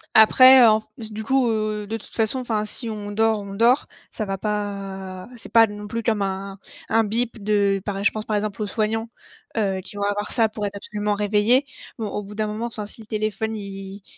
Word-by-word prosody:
après 255 +4 +9
en 220 -1 +6
f - - -28 0.3
du 215 +1 -5
coup, 260 +1 +2
heu, 215 -1 -1
de 225 +2 -2
toute 220 - -14
façon, 225 +3 +1
enfin, 220 -4 -1
si 230 +3 -1
on 210 -2 -5
dort, 220 +1 +2
on 200 -1 -8
dort, 235 +6 +3 0.2
ça 215 - -3
va 195 -1 -3
pas 195 -2 -4
cest 235 - -11
pas 225 0 +7
non 205 -1 -8
plus, 230 +2 -4
comme 220 -3 +1
un 195 0 -3 0.3
un 225 +1 +4
bip 225 0 -1
de 200 -1 +2
par 200 -1 -3
é 200 - -3
je - - +4
pense, 215 - -5
par 215 - -1
exemple, 210 0 -2
aux 210 - -1
soignants, 225 +2 -1 0.5
heu, 195 -3 0
qui 190 - -10
vont 205 - -3
avoir 205 +1 -1
ça 225 -3 +3
pour 210 -1 -3
être 200 - -7
absolument 205 +1 -2
réveillés. 210 +6 +3 0.3
Bon, 220 -3 -3
au 205 - -3
bout 205 +1 -10
d'un 215 0 0
moment, 215 +2 -3
enfin, 220 -3 -6
si 210 - -6
le 215 - -14
téléphone 215 0 -2
il 195 -1 -8
210 Hz, 230 wpm, -23 LUFS, 200-225 Hz, 0.5 s, après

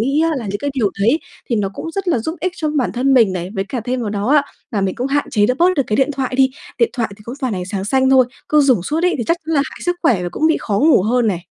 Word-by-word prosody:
nghĩ 275 +6 +1
á 330 - +2
là 245 - -4
những 205 +1 -3
cái 285 +6 -2
điều 220 -7 +1
đấy 235 +11 +3 0.3
thì 235 - +2
nó 205 -2 0
cũng 325 - -5
rất 390 +2 -3
là 330 - +2
giúp 320 +9 -3
ích 365 +3 -1
cho 310 - -2
bản 285 -5 0
thân 265 +2 +2
mình 225 -7 +4
này. 180 0 -4
Với 195 - -1
cả 250 +1 -3
thêm 250 +3 -2
vào 220 -3 -3
đó 205 0 -2
á, 290 +1 +5 0.3
là 210 - -1
mình 195 -1 -1
cũng 250 - -2
hạn 285 +1 -1
chế 205 -2 +3
được 250 - +1
bớt 350 - +5 0.2
cái 215 - 0
điện 270 +2 +2
thoại 265 -2 -3
đi, 265 -1 +4 0.3
điện 465 - +3
thoại 235 -4 -1
thì 210 - -16
cũng 240 - -6
toàn 255 -3 -1
ánh 180 -1 -4
sáng 190 +1 -4
xanh 265 +4 +2
thôi, 260 -1 +6 0.2
cứ 300 - +4
dủng 260 -10 +3
suốt 310 - -2
ấy 360 - +2
thì 235 - -1
chắc 335 - +2
chắn 325 - -1
là 280 - +3
hại - - -11
sức 355 0 0
khỏe 235 - +2
và 175 - -2
cũng 315 - +1
bị 320 - +3
khó 200 -2 -1
ngủ 300 - +4
hơn 235 +3 +1
này. 195 -5 0
255 Hz, 330 wpm, -18 LUFS, 210-295 Hz, 0.3 s, thôi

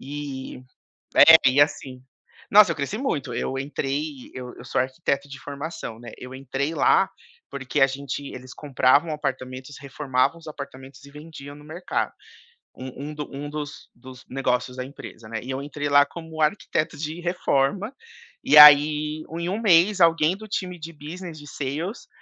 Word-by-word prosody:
E 140 -1 -7 0.7
É, 165 - +12
e 135 +3 +1
assim, 130 -3 -1 0.5
nossa, 200 -3 +7
eu - - -3
cresci 145 +8 -3
muito, 145 - -2
eu 135 +3 -3
entrei 140 0 -4
eu 125 -1 -7
eu - - -10
sou - - -1
arquiteto 140 +1 -2
de 140 0 -9
formação, 140 -5 -7
né. 120 -1 -10
Eu 125 +1 -9
entrei 135 +3 -3
lá, 450 +1 +3 0.4
porque 135 +1 -3
a 135 - +7
gente 135 0 -5
eles 130 0 -10
compravam 145 +2 +2
apartamentos, 130 -1 -5
reformavam 140 +1 -1
os 165 - -15
apartamentos 140 -2 -10
e 140 - -14
vendiam 150 -1 -11
no 150 - -14
mercado, 170 +4 -3 0.6
um 130 +3 -8
um - - -8
do 150 -1 -6
um 145 +1 -6
dos 150 -1 -7
dos 130 +1 -14
negócios 125 -1 -1
da 125 - -4
empresa, 120 -5 -11
né. 110 0 -4
E 130 - -7
eu 135 +1 -3
entrei 145 0 -4
lá 145 0 +5
como 160 -2 -9
arquiteto 155 -1 0
de 155 +3 -5
reforma, 175 - 0 0.5
e, 150 - +6
aí, 150 +1 +7 0.2
em 170 +1 -3
1 200 +4 -2
mês, 190 -1 +4
alguém 165 0 +4
do 215 +1 -11
time 185 -3 -4
de 165 +1 -8
Business, 165 +2 -9
de 145 - -12
Sales 150 - -5
145 Hz, 170 wpm, -24 LUFS, 135-160 Hz, 0.7 s, É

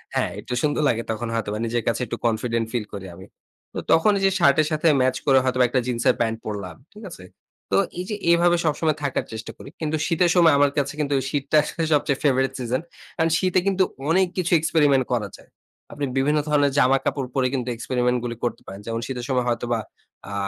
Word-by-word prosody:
হ্যাঁ, - - 0
একটু 125 - -6
সুন্দর 150 0 0
লাগে 115 0 0
তখন 110 +2 -3
হয়তোবা 105 -1 -2
নিজের 115 0 -1
কাছে 115 - 0
একটু 120 - -4
কনফিডেন্ট 115 0 0
ফিল 115 -3 -1
করি 100 -1 -6
আমি। 95 - -12 0.5
তো - - -3
তখন 165 +6 +5
ঐ - - -1
যে 195 - +4
শার্টের 150 +2 +4
সাথে 155 +2 +1
ম্যাচ 130 0 +2
করে 135 -2 +5
হয়তোবা 130 -1 +2
একটা 130 +1 +1
জিন্সের 120 -1 +1
প্যান্ট 115 -1 0
পড়লাম। 100 -5 -5 0.2
ঠিক 210 +1 -13
আছে? 90 - -11 0.5
তো 95 - +3 0.2
এই 180 - -3
যে 210 - -2 0.2
এভাবে 175 0 +4
সবসময় 155 0 +1
থাকার 140 - -1
চেষ্টা 110 +1 -6
করি। - - -11
কিন্তু 155 0 -1
শীতের 170 0 +2
সময় 165 -3 +6
আমার 145 0 +4
কাছে 145 -1 0
কিন্তু 140 -1 0
শীতটা 145 +1 0
আসলে 165 - -4
সবচেয়ে 140 -2 +1
favorite 135 -2 +2
season 125 +3 -1 0.4
কারন 165 0 +2
শীতে 185 -1 +2
কিন্তু 190 -1 +3 0.3
অনেক 185 +2 +3
কিছু 180 -1 -1
এক্সপেরিমেন্ট 145 -5 +2
করা 105 -4 -1
যায়। - - -20 0.4
আপনি 145 - -3
বিভিন্ন 150 +3 +2
ধরনের 145 -2 +3
জামা 135 +2 +4
কাপড় 135 -3 -1
পরে 130 -1 +2
কিন্তু 125 -2 -2
এক্সপেরিমেন্ট 125 +1 0
গুলি 120 -1 -4
করতে 120 - -3
পারেন। 95 +2 -9
যেমন 115 0 -2
শীতের 125 -2 -5
সময় 125 -2 +1
হয়তো 120 0 -1
বা 115 - 0 0.5
আ - - -5
135 Hz, 210 wpm, -23 LUFS, 120-155 Hz, 0.5 s, সময়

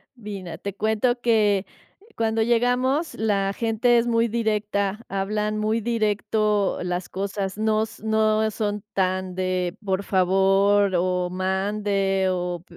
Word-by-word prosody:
Mira,, 195 -7 -7
te 200 -1 -6
cuento 220 +4 +1
que 210 -4 +2 0.5
cuando 225 0 +1
llegamos, 250 +6 +1
la 200 -3 0
gente 230 +2 +2
es 235 - +2
muy 230 0 +2
directa, 210 -2 -1
hablan 210 +2 -1
muy 215 +2 0
directo 210 -2 0
las 180 0 -3
cosas, 195 0 -3
nos 220 0 -1
no 220 0 +2
son 210 -1 -3
tan 185 -1 -1
de 185 -1 -1
por 195 0 -1
favor 195 +1 +3
o 180 0 0
mande 195 +1 0
o 180 -1 -2
205 Hz, 120 wpm, -24 LUFS, 190-220 Hz, 0.5 s, favor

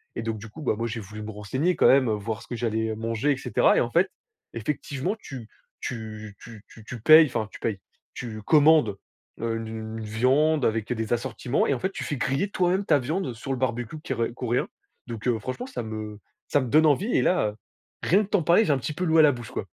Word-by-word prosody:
et - - -3
donc 115 -1 -2
du 110 +2 -9
coup, 155 - -11
bah, 110 - 0
moi 115 0 -2
j'ai 115 0 -4
voulu 105 +2 -9
me 110 +1 -6
renseigner 130 - -1
quand - - +4
même, 135 -2 +5
heu, - - +2
voir 110 +2 -4
ce - - -14
que 120 - -5
j'allais 110 -1 -1
manger, 115 +5 -1
et 135 - 0
cetera, - - +2
et - - +4
en - - 0
fait, - - +3 0.4
effectivement, 140 - -3
tu 125 -5 -9 0.3
tu 110 -3 -6
tu 115 -3 -12
tu 110 - -15
tu 120 -3 -8
payes, 155 +4 +9
enfin, 110 -4 -2
tu - - -11
payes, 105 -4 -2 0.3
tu 110 -3 -6
commandes, 150 -6 +4 0.4
heu, 115 -1 -1
une 110 0 -6
viande 130 +7 +2
avec 110 +1 -1
des 110 -1 -4
assortiments 120 +2 -1
et 140 - +2
en 125 - -3
fait, 190 - -1
tu - - -5
fais 145 - -3
griller 135 +11 0
toi-même 185 +2 +1
ta 150 -3 +4
viande 145 0 -2
sur 125 +4 -6
le 130 - -1
barbecue 120 +3 -2
qui - - -3
r 115 0 -2
coréen, 125 -1 -1 0.4
donc 115 +1 -5
heu, 115 -2 +1
franchement 130 - -5
ça 265 - -5
me 110 -1 -6 0.3
ça 145 - +2
me 130 - -3
donne 155 +4 +5
envie 180 - +2
et - - +3
là, 105 -13 +1 0.5
rien 200 +5 +4
que 200 - -9
t'en 195 -6 +2
parler, 175 +8 +5
j'ai 155 - +2
un 140 - +3
petit 150 +4 -4
peu 180 - -4
l'eau 160 0 +3
à 160 - +9
la 145 - +6
bouche, 120 -3 -8
quoi. - - -4
120 Hz, 245 wpm, -25 LUFS, 110-150 Hz, 0.5 s, payes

